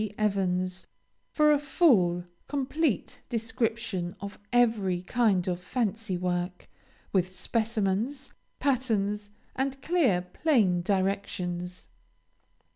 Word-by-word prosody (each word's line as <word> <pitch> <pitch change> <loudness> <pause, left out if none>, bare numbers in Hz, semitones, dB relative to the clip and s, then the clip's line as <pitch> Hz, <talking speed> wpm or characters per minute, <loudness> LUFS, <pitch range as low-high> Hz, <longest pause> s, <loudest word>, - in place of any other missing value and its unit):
Evans, 185 -3 0 0.4
for 300 -1 +4
a 295 - +4
full, 230 - +3 0.2
complete 285 - -1
description 225 -5 -2
of 200 0 -7
every 215 -7 +2
kind 205 -5 +2
of 180 -1 -1
fancy 215 -2 -1
work, 180 0 -2 0.5
with 185 -1 +1
specimens, 225 +5 -1 0.2
patterns, 210 -6 0 0.3
and 270 +1 -1
clear, 270 - +3
plain 190 - +2
directions. 185 -2 -2
205 Hz, 90 wpm, -28 LUFS, 180-245 Hz, 0.5 s, for